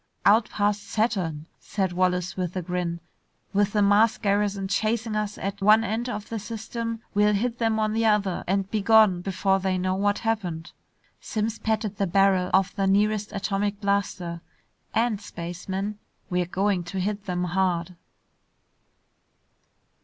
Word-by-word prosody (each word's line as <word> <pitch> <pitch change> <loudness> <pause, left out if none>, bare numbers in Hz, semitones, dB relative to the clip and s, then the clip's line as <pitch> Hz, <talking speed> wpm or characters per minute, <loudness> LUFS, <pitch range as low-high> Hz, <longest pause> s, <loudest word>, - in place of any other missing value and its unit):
"Out 215 +2 +5
past 205 0 0
Saturn," 185 -9 -1
said 190 -3 -2
Wallace 180 0 0
with 180 -1 -3
a 185 - -2
grin. 175 -1 -2 0.5
"With 205 0 +2
the 210 -1 +3
Mars 210 +2 +4
garrison 200 -1 0
chasing 220 +2 0
us 210 -1 -2
at 195 +1 -4
one 215 +3 +6
end 230 +3 -2
of 210 -3 -5
the 225 - -3
system, 230 +2 -5
we'll 210 0 +3
hit 235 +3 -1
them 225 -2 +1
on 215 -1 0
the 225 +1 +1
other 200 -4 +1
and 195 +1 +1
be 215 - 0
gone 215 -4 +5
before 195 +1 +1
they 190 -1 0
know 185 +1 0
what 205 +2 +1
happened!" 180 -8 -2 0.5
Simms 220 0 -3
patted 220 -2 -1
the 200 - 0
barrel 190 0 +3
of 190 -1 +2
the 195 -2 +1
nearest 210 +1 +2
atomic 200 0 -1
blaster. 200 -4 -1 0.5
"And, 225 -2 +1
spaceman, 190 +4 -5 0.3
we're 180 -1 +1
going 190 0 0
to 190 +2 -4
hit 205 +2 -2
them 180 -1 -1
hard!" 180 -1 0
200 Hz, 155 wpm, -25 LUFS, 185-215 Hz, 0.5 s, one